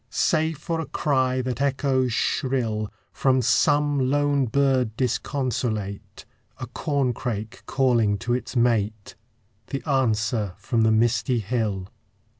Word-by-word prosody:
Save 160 -1 +1
for 165 +2 -3
a 160 - -4
cry 130 -3 0
that 130 +1 -3
echoes 135 -2 +1
shrill 115 -3 -1 0.2
From 130 -1 +2
some 145 0 +2
lone 145 -1 +2
bird 130 -3 +1
disconsolate; 120 -5 -2 0.3
A - - -5
corncrake 125 -5 -2
calling 120 -6 +2
to 120 +3 -2
its 125 +2 -3
mate; 110 -3 +1 0.5
The 140 +3 -5
answer 110 -6 +1
from 120 -4 -1
the 110 0 +4
misty 120 +3 +2
hill. 105 -4 -2
125 Hz, 115 wpm, -24 LUFS, 110-135 Hz, 0.5 s, the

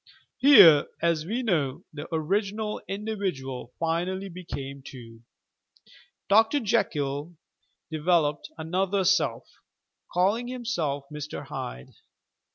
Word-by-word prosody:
Here, 200 - +8
as 170 -2 +1
we 240 +6 -2
know, 160 - 0
the 150 0 -7
original 200 +6 -1
individual 190 - -4
finally 180 +4 -1
became 140 -6 -7
two. 115 -4 -12 1.1
Dr. 225 +7 +4
Jekyll 155 - -1 0.6
developed 155 -2 +1
another 190 +4 0
self, 165 -11 +1 0.6
calling 200 +7 +1
himself 225 - -2
Mr. 150 0 -6
Hyde. 60 +1 -7
170 Hz, 90 wpm, -26 LUFS, 145-200 Hz, 1.1 s, Here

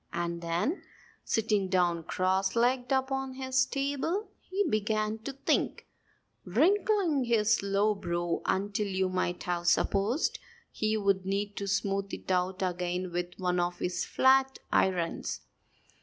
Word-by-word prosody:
And 170 0 -3
then, 170 - -1 0.4
sitting 215 -3 +1
down 175 -2 +2
cross 190 +3 0
legged 245 +2 +2
upon 265 0 0
his 260 0 +1
table, 285 +9 -2
he 395 +2 -1
began 215 -2 0
to 270 +5 -6
think, 275 - 0 0.6
wrinkling 380 - +2
his 225 -1 +3
low 200 +2 +2
brow 175 -3 -2
until 200 +2 0
you 190 -1 0
might 180 -1 -1
have 175 -1 -2
supposed 205 - +2 0.3
he 215 0 0
would 195 -2 +1
need 200 +2 -2
to 200 - -3
smooth 195 0 -1
it - - -6
out 185 +1 0
again 180 0 -2
with 175 0 -3
one 180 -1 0
of 175 0 -1
his 180 0 -2
flat 265 0 +3
irons. 180 -3 0
200 Hz, 135 wpm, -30 LUFS, 180-260 Hz, 0.6 s, his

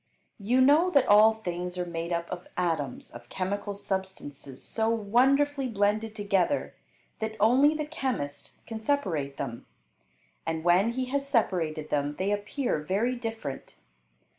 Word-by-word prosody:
You 240 +6 +2
know 300 +7 +5
that 280 -7 +4
all 215 +2 +7
things 180 -3 -4
are 180 - -1
made 170 0 -4
up 170 0 -1
of 180 0 -6
atoms 160 -7 -2
of 120 +1 -12
chemical 200 +2 -3
substances 190 -9 -5
so 225 0 0
wonderfully 265 +6 +2
blended 215 0 0
together 205 +4 0 0.5
that 220 0 -3
only 265 +8 +5
the 305 -1 -2
chemist 245 - -4
can 225 -1 -6
separate 185 - -1
them, 120 -4 -5 0.8
and 160 -1 -3
when 185 +7 +4
he 255 +1 -1
has 280 0 0
separated 165 - 0
them 145 0 0
they 195 +2 0
appear 205 - -1
very 200 +11 0
different. 225 - -6
205 Hz, 140 wpm, -28 LUFS, 170-240 Hz, 0.8 s, all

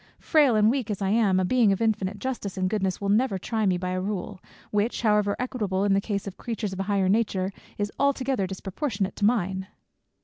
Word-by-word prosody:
Frail 290 -7 +3
and 215 +1 +5
weak 255 -4 -2
as 205 - -2
I 195 -1 0
am, 205 -3 +3
a 185 - +1
Being 235 0 +4
of 195 - 0
infinite 210 -3 0
justice 205 -4 -4
and 185 0 +1
goodness 190 -2 -1
will 200 - -2
never 210 0 +2
try 220 +2 -1
me 185 -1 +2
by 180 0 -3
a 185 0 -1
rule, 195 -1 -4 0.3
which 210 +4 0
however 210 -2 +3
equitable 210 -7 -1
in 200 -1 +3
the 195 - +3
case 200 -2 -3
of 200 - -7
creatures 220 -4 -4
of 190 - -6
a 195 +1 -3
higher 195 -2 +2
nature, 195 -2 +1 0.2
is 205 0 -2
altogether 265 -7 +1
disproportionate 195 - -3
to 205 - +1
mine." 190 -4 +1
205 Hz, 215 wpm, -26 LUFS, 190-225 Hz, 0.3 s, and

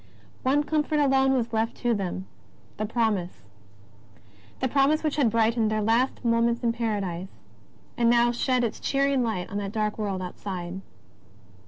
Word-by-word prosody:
One 280 +3 +2
comfort 305 0 0
alone 270 -1 +3
was 240 -3 -1
left 225 +1 0
to 240 -1 0
them 190 -2 -3 0.3
— - - -30
the 215 - -2
Promise, 210 - -1 1.2
that 260 -2 -1
Promise 285 +3 +3
which 305 -1 -1
had 270 -6 +4
brightened 225 0 +2
their 215 0 0
last 235 +4 +1
moments 235 0 +2
in 235 - +3
Paradise, 200 -6 -2 0.7
and 235 -1 +3
now 240 0 +4
shed 250 +1 +1
its 230 - -2
cheering 275 -1 +1
light 220 -7 -2
on 200 - -3
the 200 -1 -3
dark 215 0 -2
world 195 -3 -2
outside. 180 0 -6
230 Hz, 160 wpm, -26 LUFS, 205-260 Hz, 1.2 s, had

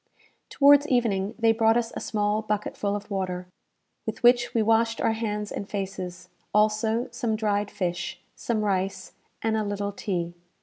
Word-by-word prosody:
Towards 285 +1 +6
evening 225 -5 +1
they 225 -1 +4
brought 225 +1 +3
us 235 -1 -1
a - - -3
small 210 0 0
bucketful 210 -1 -2
of 205 +1 -7
water, 185 -2 -2 0.6
with - - -4
which 240 0 +5
we 225 - +3
washed 225 +1 +2
our - - +2
hands 210 -2 -3
and 200 - -5
faces; 190 -3 -5 0.3
also 215 +2 +2
some 225 -2 -1
dried 205 -1 0
fish, 175 -2 -3 0.2
some 220 -3 -1
rice, 190 -1 -1 0.3
and 225 -1 +1
a 215 - +1
little 205 0 -2
tea. 175 -4 -3
210 Hz, 160 wpm, -26 LUFS, 200-225 Hz, 0.6 s, Towards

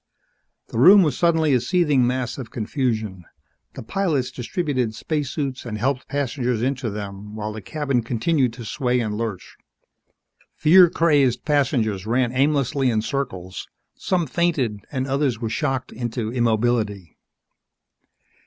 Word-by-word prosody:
The 115 - -3
room 190 +9 +8
was 150 -6 0
suddenly 160 -4 +2
a 125 - +4
seething 145 -3 +2
mass 125 +1 -2
of 120 -4 -7
confusion. 110 -5 -2 0.5
The - - -7
pilots 150 - -1
distributed 130 - -2
spacesuits 140 0 -3
and 110 -3 -5
helped 130 +3 -1
passengers 125 -4 -1
into 130 -2 -1
them 100 0 -7
while 110 0 -4
the 110 - -7
cabin 140 +2 -1
continued 125 +3 0
to 115 -1 -9
sway 125 +1 0
and 110 -3 -2
lurch. 110 -4 -5 1.0
Fear 175 +3 +6
crazed 145 -7 +2
passengers 120 - 0
ran 120 +1 +1
aimlessly 135 0 +1
in 110 -2 0
circles. 95 -8 -4 0.3
Some 180 -3 0
fainted 140 -8 0
and 130 -2 -2
others 135 -4 0
were 115 -2 -3
shocked 130 +3 -2
into 115 -1 -4
immobility. 110 - 0
125 Hz, 135 wpm, -22 LUFS, 110-145 Hz, 1.0 s, room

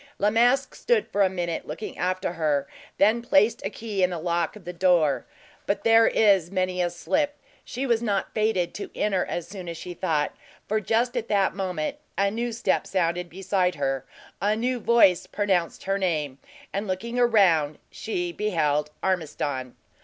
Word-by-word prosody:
La 205 +1 +2
Masque 245 +4 +3
stood 470 -4 +1
for 205 - +1
a 190 - +5
moment 175 -3 -3
looking 160 +8 -6
after 185 0 -1
her, 150 -4 0
and - - -20
then 220 +4 +4
placed 220 -1 +3
a 195 - -1
key 210 -2 -4
in 180 - +4
the 175 - -4
lock 170 +1 -1
of 205 -5 -13
the 180 - -5
door. 175 -5 +2 0.4
But 200 - -1
there 225 0 +6
is 195 -6 +3
many 185 -1 -1
a 175 - +1
slip 290 - -1 0.3
she 260 +3 -4
was 235 -3 +2
not 205 -4 -1
fated 215 -5 0
to - - -6
enter 200 -3 +1
as 175 -1 -4
soon 185 -2 -8
as 170 - -6
she 175 +2 -7
thought; 160 -4 -1 0.3
for 215 +1 +1
just 230 +4 +1
at 235 -2 -2
that 200 -2 +2
moment 185 - -3 0.2
a 200 0 +2
new 235 +2 -2
step 230 - 0
sounded 175 -1 -1
beside 185 0 0
her, 135 -2 -1 0.4
a 205 +2 +2
new 245 +3 -1
voice 225 -6 +4
pronounced 190 -5 -1
her 195 +1 0
name, 150 -7 -1 0.3
and 200 +2 -2
looking 230 +6 -3
around, 185 -11 +4
she 175 -5 -3
beheld 150 -7 0
Ormiston. 145 -8 -2
190 Hz, 180 wpm, -25 LUFS, 170-215 Hz, 0.4 s, there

